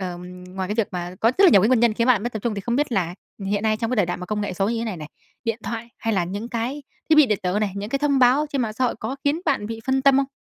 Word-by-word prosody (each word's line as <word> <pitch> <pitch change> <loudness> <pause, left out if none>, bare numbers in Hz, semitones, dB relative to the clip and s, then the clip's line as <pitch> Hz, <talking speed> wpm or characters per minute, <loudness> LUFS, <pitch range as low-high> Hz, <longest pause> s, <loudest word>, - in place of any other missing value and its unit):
Ờm, 180 0 -7
ngoài 185 0 -5
cái 210 - -1
việc 225 -3 0
mà 175 0 -4
có 225 - +4
rất 395 - +7
là 370 - +8
nhiều 195 - +7
cái 215 - +4
nguyên 255 -2 +4
nhân 235 -2 +3
khiến 230 +2 +1
bạn 235 -6 +4
mất 240 +1 -3
tập 220 - -3
trung, 235 -3 -1
thì 200 - -4
không 235 +4 -1
biết 290 -3 0
là 180 -4 0 0.3
hiện 205 +1 0
nay 215 -1 +2
trong 225 +1 -2
cái 255 - 0
đời 200 -5 +3
đại 175 - -2
mà 180 - -7
công 210 +1 -2
nghệ 205 - -2
số 195 +2 0
như 230 0 -1
thế 230 - -2
này 210 -5 -4
này, 150 -1 -8 0.4
điện 230 -1 -1
thoại 230 +2 -5
hay 225 -1 -1
là 180 -3 +1
những 205 +6 -5
cái 245 +5 -3 0.3
thiết - - +7
bị 305 - +7
điện 210 -4 0
tử 185 +2 0
này, 210 -2 -1
những 205 +1 -4
cái 275 - 0
thông 285 -1 +2
báo 260 +4 +4
trên 275 -3 0
mạng 220 -2 -2
xã 255 +4 -1
hội 245 - +1
có 270 - -4
khiến 290 +4 +1
bạn 205 - 0
bị 225 0 -6
phân 265 0 +1
tâm 275 -1 +5
không? 275 - +2
225 Hz, 350 wpm, -23 LUFS, 195-250 Hz, 0.4 s, là